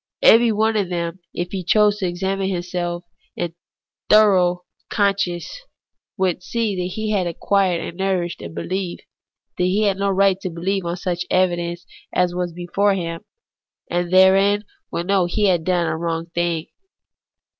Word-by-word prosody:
Every 230 0 +7
one 220 +1 +1
of 195 -4 0
them, 170 0 -3
if 175 0 -4
he 190 -2 -3
chose 210 +3 +3
to 190 - 0
examine 190 +2 -2
himself 175 -1 -3 0.3
in 170 -1 -3 0.6
foro 185 -4 +5 0.3
conscientice, 195 -4 0 0.7
would 185 -3 +1
know - - -31
that 200 -6 -1
he 215 -1 -2
had 190 -4 +1
acquired 180 0 +1
and 170 - -8
nourished 185 -3 -1
a - - -6
behef, 185 +2 -4 0.6
when 180 - +2
he 200 +4 +1
had 200 -2 +2
no 200 0 +1
right 195 0 +3
to 185 - -3
beheve 180 +3 -2
on 170 +1 -2
such 175 0 -3
evidence 175 -1 0 0.3
as 180 -1 +1
was 180 -1 -2
before 180 +4 0
him; 165 -2 -4 0.7
and 175 0 -1
therein 195 +2 +5
he - - -27 0.2
would 170 - -3
know 190 -2 +2
that 175 - -7
he 210 - +2
had 175 -3 +1
done 175 -1 +1
a 160 -1 -1
wrong 165 0 -2
thing. 170 -2 -1
180 Hz, 165 wpm, -21 LUFS, 175-195 Hz, 0.7 s, Every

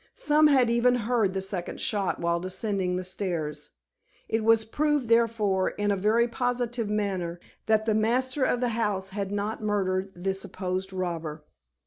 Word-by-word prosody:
Some 300 +1 +4
had 260 -5 +4
even 240 +1 +3
heard 225 -4 0
the 190 - -1
second 190 -2 -4
shot 200 -3 0
while 170 0 0
descending 185 0 -1
the 185 - -2
stairs. 175 -5 -3 0.6
It 225 0 0
was 225 0 +4
proved, 290 +1 0
therefore, 220 -5 +2
in 205 0 -1
a - - +2
very 215 +5 +2
positive 240 -2 -2
manner, 190 -5 -2 0.3
that 220 0 +3
the 220 - +2
master 255 +5 +1
of 250 -1 +1
the 245 - +1
house 210 -4 -1
had 200 0 -3
not 205 +2 -2
murdered 195 -2 -1
the 190 +2 -1
supposed 190 0 -4
robber. 165 -5 -4
210 Hz, 160 wpm, -27 LUFS, 185-235 Hz, 0.6 s, Some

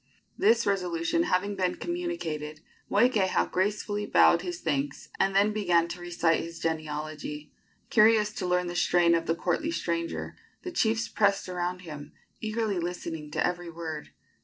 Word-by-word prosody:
This 235 0 +3
resolution 180 - 0
having 200 +2 +1
been 185 -2 0
communicated, 165 - -4 0.3
Moikeha 205 -3 +2
gracefully 205 +2 -1
bowed 170 - +5
his 175 -1 -5
thanks, 145 -2 -2
and 195 0 +2
then 205 +2 +4
began 175 -5 +2
to 175 +1 -6
recite 170 -1 +1
his 165 0 -6
genealogy. 155 -2 -4 0.4
Curious 215 -1 +5
to 185 -4 -3
learn 180 0 +2
the 175 0 -5
strain 175 -1 +4
of 165 0 +1
the 165 - +2
courtly 305 - -1
stranger, 170 - -3 0.3
the 360 - -5
chiefs 225 -9 +1
pressed 200 -3 +1
around 180 0 -3
him, 150 -3 -9 0.3
eagerly 215 -3 -1
listening 165 -3 -4
to - - 0
every 175 -1 -2
word. 160 -2 -6
180 Hz, 150 wpm, -28 LUFS, 165-205 Hz, 0.4 s, bowed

